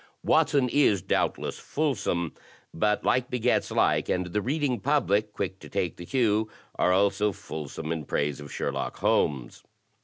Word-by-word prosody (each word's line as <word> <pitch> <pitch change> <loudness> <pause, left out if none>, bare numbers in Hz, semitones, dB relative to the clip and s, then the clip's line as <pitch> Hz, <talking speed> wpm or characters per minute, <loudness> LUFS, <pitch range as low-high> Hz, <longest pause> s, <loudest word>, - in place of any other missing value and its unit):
Watson 140 -3 +3
is 120 - +3
doubtless - - -1
fulsome, 100 - -1 0.4
but 105 +4 +1
like 125 0 +1
begets 125 -2 +1
like, - - +2
and 90 0 +1
the 105 - +1
Reading 135 0 0
Public, 105 -5 +1
quick 95 -2 -4
to - - -12
take 95 -4 -2
the 85 - -9
cue, 110 -4 +2 0.2
are 90 - +2
also 100 +2 +3
fulsome 80 -2 -6
in 80 -3 -3
praise 70 -1 -1
of 75 -1 -9
Sherlock - - -3
Holmes. 65 -5 0
100 Hz, 150 wpm, -27 LUFS, 85-125 Hz, 0.4 s, Watson